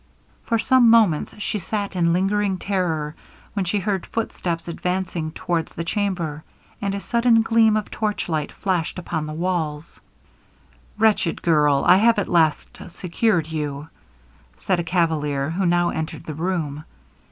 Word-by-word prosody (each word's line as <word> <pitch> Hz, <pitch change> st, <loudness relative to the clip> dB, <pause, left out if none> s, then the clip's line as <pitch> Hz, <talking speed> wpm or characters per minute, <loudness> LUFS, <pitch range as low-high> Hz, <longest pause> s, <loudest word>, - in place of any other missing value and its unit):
For 230 Hz, -, +1 dB
some 245 Hz, +1 st, +4 dB
moments 215 Hz, -10 st, +3 dB
she 210 Hz, 0 st, -2 dB
sat 200 Hz, +1 st, -3 dB
in 170 Hz, -2 st, +2 dB
lingering 195 Hz, +2 st, +1 dB
terror, 170 Hz, -6 st, -1 dB, 0.4 s
when 200 Hz, -3 st, -1 dB
she 180 Hz, +4 st, 0 dB
heard 195 Hz, -2 st, -2 dB
footsteps 175 Hz, -7 st, -3 dB
advancing 180 Hz, -2 st, -2 dB
towards 170 Hz, -1 st, -3 dB
the 165 Hz, -, -3 dB
chamber, 170 Hz, -5 st, -2 dB, 0.4 s
and 200 Hz, -1 st, -1 dB
a -, -, -3 dB
sudden 235 Hz, +1 st, +3 dB
gleam 225 Hz, -1 st, +4 dB
of 210 Hz, -, -4 dB
torchlight 175 Hz, -8 st, -2 dB
flashed 180 Hz, -4 st, -2 dB
upon 160 Hz, -3 st, -3 dB
the 155 Hz, -, -5 dB
walls. 165 Hz, -2 st, -3 dB, 1.0 s
'Wretched 215 Hz, -5 st, +2 dB
girl! 150 Hz, -4 st, +3 dB
I 180 Hz, +1 st, +7 dB
have 230 Hz, +2 st, +4 dB
at 205 Hz, -, 0 dB
least 160 Hz, -3 st, +1 dB
secured 180 Hz, +1 st, 0 dB
you!' 150 Hz, -1 st, -4 dB, 0.7 s
said 185 Hz, -2 st, 0 dB
a -, -, -1 dB
cavalier, 155 Hz, -5 st, 0 dB
who 185 Hz, +2 st, 0 dB
now 175 Hz, 0 st, +2 dB
entered 160 Hz, +1 st, -4 dB
the 155 Hz, -, -5 dB
room. 155 Hz, -3 st, -3 dB
175 Hz, 145 wpm, -22 LUFS, 160-205 Hz, 1.0 s, I